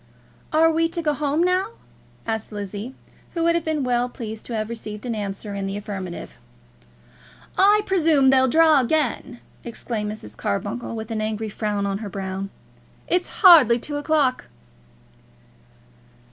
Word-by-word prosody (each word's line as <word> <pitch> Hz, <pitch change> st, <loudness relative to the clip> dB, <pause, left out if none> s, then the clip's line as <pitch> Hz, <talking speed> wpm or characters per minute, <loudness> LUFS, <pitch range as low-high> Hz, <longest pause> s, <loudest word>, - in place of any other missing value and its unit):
"Are 325 Hz, +1 st, +4 dB
we 330 Hz, +1 st, +1 dB
to 340 Hz, 0 st, -3 dB
go 300 Hz, -1 st, +2 dB
home 295 Hz, +2 st, 0 dB
now?" 370 Hz, +5 st, +1 dB, 0.5 s
asked 220 Hz, -1 st, -3 dB
Lizzie, 205 Hz, +4 st, -6 dB, 0.4 s
who 335 Hz, -, 0 dB
would 335 Hz, 0 st, +4 dB
have 340 Hz, -1 st, 0 dB
been 315 Hz, -3 st, -1 dB
well 245 Hz, 0 st, +1 dB
pleased 220 Hz, -3 st, -7 dB
to 235 Hz, -, -4 dB
have 215 Hz, -1 st, -2 dB
received 215 Hz, -1 st, -7 dB
an 240 Hz, -, -2 dB
answer 205 Hz, 0 st, -5 dB
in 200 Hz, -1 st, -3 dB
the 195 Hz, +1 st, -3 dB
affirmative. 195 Hz, -4 st, -6 dB, 1.2 s
"I 415 Hz, +2 st, +5 dB
presume 320 Hz, -8 st, +4 dB
they'll 260 Hz, -1 st, +4 dB
draw 315 Hz, +2 st, +5 dB
again," 255 Hz, -2 st, -1 dB, 0.2 s
exclaimed 220 Hz, -2 st, -4 dB
Mrs. 105 Hz, -, -9 dB
Carbuncle, 225 Hz, -, -3 dB
with 220 Hz, 0 st, -6 dB
an 220 Hz, -1 st, -2 dB
angry 215 Hz, 0 st, -2 dB
frown 205 Hz, -1 st, -2 dB
on 200 Hz, 0 st, -2 dB
her 215 Hz, -2 st, -6 dB
brow. 190 Hz, 0 st, -4 dB, 0.6 s
"It's 360 Hz, 0 st, 0 dB
hardly 300 Hz, -, +8 dB
two 290 Hz, +4 st, -5 dB
o'clock." 290 Hz, -3 st, +1 dB
240 Hz, 150 wpm, -23 LUFS, 210-310 Hz, 1.2 s, hardly